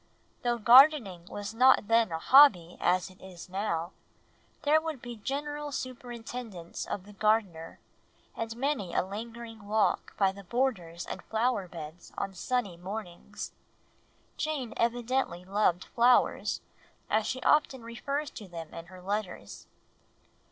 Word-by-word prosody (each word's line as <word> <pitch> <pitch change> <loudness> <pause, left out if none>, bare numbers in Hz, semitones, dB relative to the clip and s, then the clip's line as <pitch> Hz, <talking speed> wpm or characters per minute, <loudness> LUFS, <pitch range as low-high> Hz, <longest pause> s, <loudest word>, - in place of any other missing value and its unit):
Though 240 -1 +1
gardening 235 - +6
was 205 +1 -6
not 245 -2 +5
then 225 -4 +3
a 160 - -1
hobby, 180 - +6
as 185 +1 +2
it 185 - -20
is 185 -3 -10
now, 180 -3 -2 0.7
there 310 +1 +4
would 320 -4 -4
be 240 0 -7
general 290 +5 -4
superintendence 240 -7 -6
of 190 - -4
the 205 - -13
gardener, 200 -6 0 0.6
and 225 0 -4
many 255 - -1
a - - +3
lingering 225 +1 -8
walk 215 +1 +1
by 195 -2 +3
the 200 +1 -11
borders 185 -7 -1
and - - -6
flower 225 -3 0
beds 165 0 -10
on 195 - -3
sunny 200 -1 -2
mornings. 180 0 -7 0.9
Jane 295 -6 -2
evidently 235 -6 0
loved 190 -2 +1
flowers, 245 +1 +3 0.5
as 215 0 +1
she 255 - -2
often 275 -5 +3
refers 280 +6 -3
to 210 - -9
them 165 -3 -8
in 165 0 -8
her 185 0 -13
letters. 195 - -4
220 Hz, 135 wpm, -29 LUFS, 185-250 Hz, 0.9 s, gardening